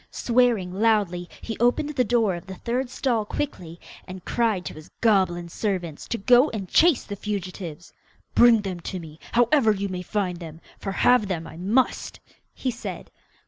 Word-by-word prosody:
Swearing 235 -7 +1
loudly, 195 -4 +1
he 225 - -5
opened 245 +5 +2
the 260 -4 +1
door 225 -4 +2
of 175 +1 -8
the 190 - -7
third 245 +6 -2
stall 245 -4 0
quickly, 180 - -5 0.3
and 185 -1 -9
cried 220 -6 0
to - - -5
his 155 0 -12
goblin 185 -6 +2
servants 175 -4 -3
to 235 - -2
go 245 +7 +5
and 200 -4 -5
chase 320 - +4
the 205 - -6
fugitives. 185 -5 -6 0.4
'Bring 235 -2 +6
them 190 -3 -5
to 185 +2 -5
me, 160 -2 -11
however 240 0 +4
you 200 -1 -2
may 180 -1 -4
find 185 -1 -2
them, 160 -2 -9 0.2
for 195 - -4
have 230 +2 +3
them 170 -4 -3
I - - -10
must!' 205 +10 0 0.4
he 260 - -2
said. 240 - -7
200 Hz, 175 wpm, -24 LUFS, 180-235 Hz, 0.4 s, Bring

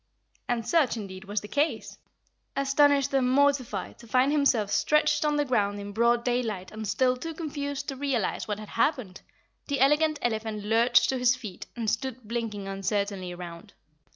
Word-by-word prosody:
And 235 -2 -1
such, 295 -8 +2
indeed, 190 -3 -7
was 205 +1 -2
the 210 - -9
case. 290 +8 -1 0.6
Astonished 280 0 +3
and 260 -2 +2
mortified 270 -7 +1
to 235 - -14
find 255 +5 +3
himself 260 -9 +2
stretched 300 +3 +2
on 300 -1 +1
the 295 0 +1
ground 205 -6 0
in 205 0 -6
broad 235 +2 +2
daylight 230 -7 -1
and 215 0 -6
still 255 +5 +2
too 325 +6 -6
confused 285 -3 -4
to 270 - -4
realize 260 -7 -1
what 210 -1 -2
had 215 -1 -9
happened, 230 -6 -1 0.5
the 285 -1 -1
Elegant 300 +3 +3
Elephant 220 -2 -2
lurched 230 +3 +4
to 265 - 0
his 250 0 +4
feet 215 -8 -8
and 230 -2 -4
stood 235 +1 -2
blinking 220 -4 -4
uncertainly 195 -1 -2
around. 175 +3 -9
240 Hz, 170 wpm, -27 LUFS, 210-280 Hz, 0.6 s, lurched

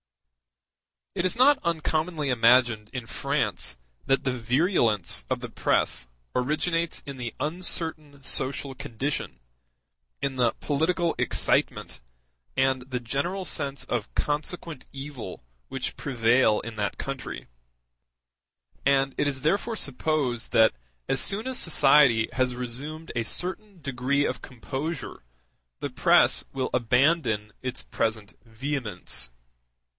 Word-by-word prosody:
It - - -1
is 185 - +4
not 275 +3 +5
uncommonly 160 -2 0
imagined 120 -2 +4
in 125 -3 -5
France - - -1 0.3
that 135 - +3
the 130 - +1
virulence 120 - +1
of - - -1
the - - -5
press - - +1 0.3
originates 165 +6 0
in 140 -2 -7
the 120 -2 -5
uncertain 155 -3 -1
social 135 +1 +2
condition, 125 - -4 0.8
in 135 -1 -2
the 120 -2 +3
political 165 +4 0
excitement, - - 0 0.6
and 130 -1 +2
the 125 -1 -4
general 170 +11 -2
sense 140 -3 -1
of 120 -4 -3
consequent 155 0 -2
evil 135 - -7 0.2
which - - -4
prevail 120 -3 +3
in 115 -1 -8
that 100 -1 -2
country; 135 -1 -5 1.4
and 135 0 +3
it 145 - +2
is 135 -2 -2
therefore 200 - +1
supposed 140 - -1
that 110 0 +6 0.4
as 135 - +1
soon 210 +2 +1
as 260 -1 +1
society 140 -8 +5
has 130 -1 +1
resumed 140 +7 -5
a 115 - +1
certain 185 - -4
degree 140 +1 0
of - - -2
composure 135 +5 -5 0.6
the - - -3
press - - +4
will 130 -1 -1
abandon 125 -3 +2
its 130 0 -4
present 110 -2 -2
vehemence. 115 - -3
135 Hz, 120 wpm, -26 LUFS, 120-155 Hz, 1.4 s, that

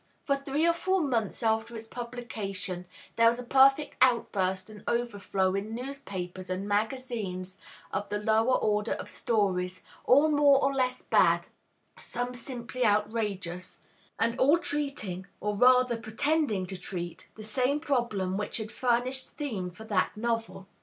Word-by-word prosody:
For 280 - +2
three 275 +3 -1
or 340 - +4
four 375 +2 +1
months 235 - -1
after 225 +1 0
its 225 - -7
publication 215 -7 -5 0.3
there 230 0 +6
was 235 +1 +3
a 250 - -6
perfect 270 +4 +4
outburst 190 -7 +2
and 215 -1 -12
overflow 205 -5 0
in 205 +3 -3
newspapers 190 -9 -6
and 185 +2 -3
magazines 205 -4 -2 0.3
of 205 +1 -2
the 205 - -1
lower 220 +4 +3
order 210 +1 0
of - - -7
stories, 185 -5 0 0.2
all 285 +5 +6
more 290 -2 +5
or 275 0 +1
less 255 -1 0
bad, - - +3 0.5
some 245 +1 -4
simply 245 0 -5
outrageous, 210 -4 -1 0.4
and 230 +1 0
all 290 +5 +5
treating, 275 - -2
or 210 0 -2
rather 250 +1 +5
pretending 225 -2 0
to 185 0 -6
treat, 175 -2 -6
the 215 - -9
same 255 +6 +1
problem 235 - -1
which 210 - -2
had 220 -1 -5
furnished 255 +1 +1
theme 220 - -3
for 180 +5 -12
that 210 -2 0
novel. 225 -3 -2
225 Hz, 145 wpm, -29 LUFS, 200-255 Hz, 0.5 s, there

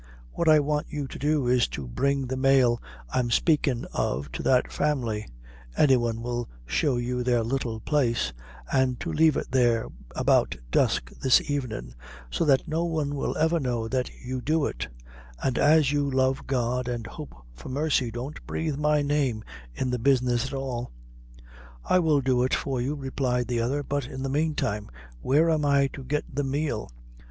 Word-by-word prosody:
What 165 - +1
I 155 -1 +7
want 150 +1 -1
you 145 -2 -4
to - - -9
do 145 -1 +1
is 125 -1 +3
to 70 -3 -6
bring 140 - 0
the 130 +1 -3
male 130 -3 +3 0.3
I'm 125 -2 +1
spakin' 135 -1 +2
of 70 +2 -2
to - - -5
that 130 -1 +2
family; 120 -8 -1 0.5
any 135 -3 +6
one 115 -2 -1
will 120 0 -3 0.2
show 130 - +1
you 125 +1 -2
their 120 -2 +2
little 115 -2 -2
place; 120 - 0 0.4
an' 130 -1 +2
to 165 +6 -5
leave 160 -1 +4
it - - -4
there 120 -3 +3 0.3
about - - +2
dusk - - +1
this 130 -2 +6
evenin', 120 - -3 0.4
so - - 0
that 135 -3 +3
no 160 +2 0
one 155 -4 -1
will 140 - -2
ever 160 +2 +2
know 120 -5 -1
that 130 0 -1 0.2
you 130 0 -3
do 155 +2 +1
it; - - -3 0.6
an' 130 -2 0
as 150 -1 +5
you 145 -1 +1
love 130 0 +1
God 125 -1 0
an' 120 -2 -3
hope 145 +6 -9 0.2
for - - -10
mercy, 140 -2 +1
don't 125 +6 -6
breathe 155 -3 -2
my 150 0 +2
name 140 -6 0 0.3
in 130 -1 -1
the 125 - -1
business 125 -1 +2
at 130 - -8
all." 130 -3 -3 1.0
"I 185 - +4
will 155 -5 +3
do 130 -2 +2
it 130 - +2
for 130 -3 -2
you," 140 +5 -1
replied 130 -3 -1
the 120 -1 0
other; 140 +5 -1
"but 140 -2 -2
in 130 +1 -6
the 135 - -2
meantime 140 -8 -1 0.3
where 150 +5 +3
am 155 -2 +1
I 140 -1 +4
to 135 - -8
get 150 +3 -1
the 145 +2 -1
meal?" 135 - -2
130 Hz, 180 wpm, -26 LUFS, 120-145 Hz, 1.0 s, I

